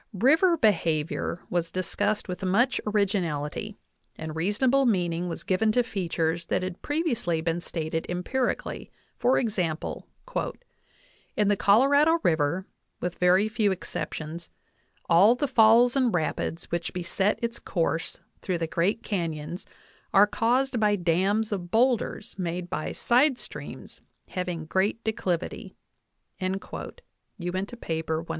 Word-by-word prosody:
River 315 - +4
be 225 -8 +5
havior 165 -1 -2
was 170 -1 0
discussed 185 +4 -1
with 180 0 -5
much 230 +8 +2
originality, 200 -2 -1 0.4
and 160 0 -6
reasonable 245 +10 +2
meaning 175 -4 0
was 165 - -6
given 215 +4 +2
to 245 - +3
features 170 -6 -2
that - - 0
had 185 -1 -5
previously 250 - 0
been 165 +1 -1
stated 160 -1 -3
empirically; 235 +9 -2 0.3
for 255 - +3
example: 180 -9 -2 1.3
"In 210 -1 +3
the 205 - +4
Colorado 280 +11 +5
river, 160 +3 +1 0.3
with 180 0 -4
very 185 +3 +4
few 215 -2 +1
exceptions, 165 -2 -5 0.6
all 190 +8 +6
the 285 +3 -1
falls 240 0 +5
and 255 -4 +3
rapids 165 -1 -2
which 170 0 -2
beset 180 +3 0
its 235 0 -2
course 165 -1 -2 0.2
through 185 -2 -1
the 165 - -1
great 175 +7 0
canons 170 -3 -3 0.5
are 195 +1 +8
caused 245 +4 +1
by 210 -1 +3
dams 195 +5 +1
of 180 -4 -3
boulders 230 0 +1
made 175 0 -3
by 155 - -2
side 255 +2 +3
streams - - -9 0.3
having 180 -3 -3
great 195 +7 0
declivity" 185 -6 -2 0.6
(Uinta, 190 0 -4 0.4
193). 175 -4 -3
190 Hz, 125 wpm, -27 LUFS, 170-225 Hz, 1.3 s, are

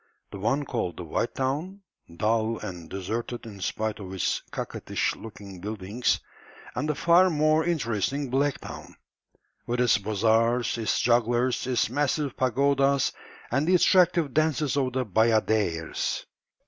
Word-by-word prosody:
The 100 - -7
one 135 +8 0
called 115 -9 -3
the 90 - -5
"white 85 +8 -2
town," 150 +10 -2 0.4
dull 110 +2 +1
and 85 -5 -7
deserted 115 +6 -4
in 100 -3 -10
spite 110 +2 -2
of 95 -2 -8
its 95 - 0
coquettish - - -2
looking 100 -4 -10
buildings, 105 +3 -1 0.5
and 150 - -2
the 150 - +1
far 170 +5 +5
more 155 0 +3
interesting 135 - -1
"black 140 +1 +1
town," - - -9 0.7
with 120 +1 -1
its 125 -4 +4
bazaars, 115 +4 +2
its 110 - 0
jugglers, 120 +1 +2
its 125 -2 +2
massive 145 0 0
pagodas, 140 +2 +2 0.4
and 140 +6 +1
the 185 - +5
attractive 170 -5 +4
dances 155 -2 +1
of 130 -3 0
the 130 0 0
bayadères. 110 -6 +1
120 Hz, 135 wpm, -26 LUFS, 110-140 Hz, 0.7 s, far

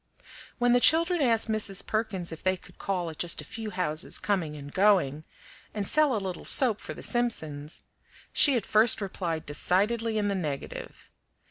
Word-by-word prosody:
When 245 -1 +2
the 245 - +5
children 335 +5 +4
asked 230 -4 +2
Mrs. 210 -3 -1
Perkins 210 -6 -3
if 165 - -9
they 185 0 0
could - - -19
call 180 -4 -3
at 155 - -14
just 175 -1 -1
a - - -4
few 220 -1 -7
houses 180 -5 -2
coming 175 -7 -2
and 145 -1 -10
going, 180 -7 +2 0.5
and 205 -2 -3
sell 305 -5 +2
a - - 0
little 185 -2 -6
soap 240 -6 +5
for - - -7
the - - -8
Simpsons, 160 -12 -2 0.5
she 280 - +6
at 220 - -4
first 220 +2 +5
replied 175 -5 -4
decidedly 215 +9 0
in 205 -1 0
the 200 - 0
negative. 150 -7 -6
200 Hz, 175 wpm, -27 LUFS, 170-225 Hz, 0.5 s, she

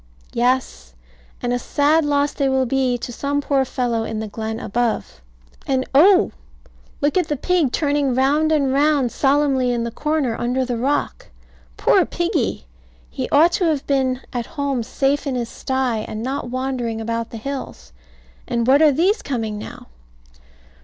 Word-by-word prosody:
Yes. 240 - -1 0.5
And 245 0 0
a 245 - 0
sad 295 +6 +2
loss 285 0 +1
they 275 -2 0
will 265 0 +2
be 255 -1 +1
to 245 0 -7
some 285 +4 -1
poor 275 -1 +1
fellow 245 -3 -1
in 220 -1 -4
the 220 - -4
glen 220 +1 -5
above. 230 - -2 0.5
And 260 -1 +1
oh! 365 +8 +6 0.7
Look 290 +4 +1
at 350 - -1
the 295 - -2
pig 335 -3 +1
turning 285 -3 +1
round 290 +4 +2
and 280 -4 +2
round 285 -3 +2
solemnly 270 -2 +2
in 240 -1 -1
the 235 - -3
corner 295 -3 -1
under 255 +2 0
the 245 -1 -2
rock. 240 - -1 0.5
Poor - - +4
piggy! - - -2 0.5
He - - -4
ought 320 +4 +5
to 355 - 0
have 305 -4 0
been 265 -2 0
at 240 -2 -3
home 280 -3 0
safe 275 +5 -1
in 265 - -1
his 240 -2 -3
stye, 260 -4 -1
and 215 +1 -5
not 260 -1 -3
wandering 255 -3 -2
about 230 +1 -3
the 230 - -7
hills. 220 - -7 0.5
And 235 -1 0
what 270 +4 +5
are 310 -2 +6
these 370 - +2
coming 225 -6 -3
now? - - -9
265 Hz, 165 wpm, -21 LUFS, 235-285 Hz, 0.7 s, oh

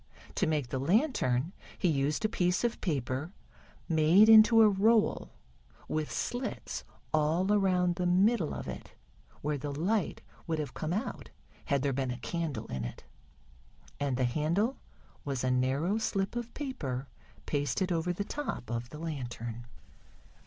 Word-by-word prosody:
To 195 - +1
make 150 -5 0
the 130 - -2
lantern 170 - +1 0.2
he 185 - +1
used 150 +4 +1
a - - +5
piece 180 -3 0
of 240 -1 -1
paper 140 - -2 0.6
made 165 +7 +5
into 225 +1 +8
a - - +8
roll, 210 +2 +3 0.6
with 155 -1 -2
slits 245 +1 -3 0.3
all 160 +6 +2
around 180 -3 +2
the 180 -1 0
middle 185 0 +3
of - - -6
it - - -7 0.5
where 150 -1 -1
the 145 - -4
light 185 +8 -1 0.3
would 160 -1 0
have 150 -4 -4
come 155 - -3
out 205 +5 -3 0.4
had 140 -2 +1
there 140 -1 +1
been 130 0 -1
a 125 - -3
candle 155 -8 -3
in 65 -1 -4
it. - - -7 1.0
And 140 -3 0
the 130 - +1
handle 165 - 0 0.4
was 135 -3 -3
a 130 - +2
narrow 135 - +1
slip 195 -1 -1
of 240 -1 -4
paper 140 - -4 0.4
pasted 145 +6 0
over 170 +1 0
the 180 +3 -2
top 265 - -4
of 120 0 -3
the 150 - -9
lantern. 120 -7 -5
160 Hz, 150 wpm, -31 LUFS, 135-200 Hz, 1.0 s, into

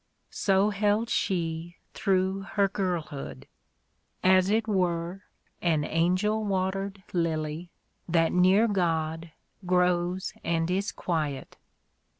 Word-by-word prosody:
So 195 +1 +2
held 210 +3 +1
she 170 -2 -1 0.2
through 190 -1 +1
her 200 -1 +3
girlhood; 175 -7 -4 0.8
as 185 0 +5
it 220 +1 +1
were 180 -2 -1 0.4
An 160 -4 +2
angel 185 +8 +1
watered 195 0 -2
lily, 160 -1 -1 0.4
that 165 -1 +3
near 185 +5 +4
God 165 -4 -1 0.3
Grows 180 0 +1
and 165 +1 0
is 195 +3 0
quiet. 155 -6 -3
180 Hz, 100 wpm, -27 LUFS, 165-195 Hz, 0.8 s, as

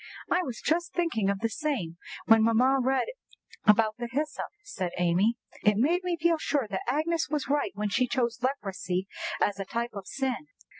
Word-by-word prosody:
"I 360 - +4
was 255 -10 -5
just 340 +3 0
thinking 305 - +1
of 200 -1 -1
the 230 - +2
same 225 - -2 0.3
when 225 -1 +6
mamma 245 +4 +4
read 265 +1 +2 0.6
about 215 0 +5
the 240 -1 -3
hyssop," 300 +4 -2 0.2
said 185 - -4
Amy. 180 +6 +3 0.3
"It 210 -1 +4
made 335 - +2
me 355 -2 -1
feel 335 0 +3
sure 285 -5 0
that 190 - -1
Agnes 320 +3 0
was 300 -1 -1
right 290 -6 +2
when 210 0 -1
she 250 +5 +2
chose 240 -1 -1
leprosy 190 -8 -2 0.3
as 200 -1 +1
a 195 - -3
type 235 +4 -3
of 200 -2 -7
sin." 270 +1 -2
240 Hz, 185 wpm, -28 LUFS, 205-300 Hz, 0.6 s, when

